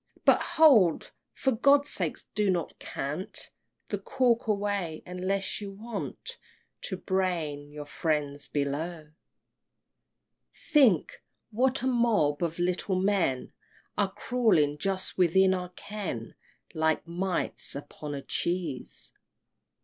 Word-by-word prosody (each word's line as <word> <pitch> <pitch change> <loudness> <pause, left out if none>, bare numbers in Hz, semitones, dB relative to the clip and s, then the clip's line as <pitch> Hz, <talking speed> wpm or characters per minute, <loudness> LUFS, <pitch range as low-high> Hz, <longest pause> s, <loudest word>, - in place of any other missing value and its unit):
But - - +6 0.2
hold! 240 - +6 0.2
for 265 - 0
God's 280 +4 +4
sake - - 0 0.2
do 210 -1 +1
not 175 -3 -1
cant 150 +7 -4 0.4
The 205 - -2
cork 235 +3 +1
away 200 -6 -1
unless 190 +3 -2
you 200 - -5
want 220 +2 -6 0.5
To 190 - -4
brain 170 -7 -1
your 150 0 -7
friends 145 -2 -2
below. 150 +2 -3 1.4
XII. - - -35 0.2
Think! 250 - +4 0.3
what 255 +3 +1
a - - +1
mob 230 - +2
of 170 -1 -1
little 180 +2 0
men 190 -10 +1 0.4
Are 200 -2 +1
crawling 185 -13 +2
just 190 +1 -2
within 190 +2 +5
our 180 -1 -3
ken, 180 - -6 0.4
Like 160 -1 +1
mites 180 -2 -1
upon 145 +1 -6
a 140 - -6
cheese! 170 -7 -3
185 Hz, 115 wpm, -28 LUFS, 155-210 Hz, 1.4 s, But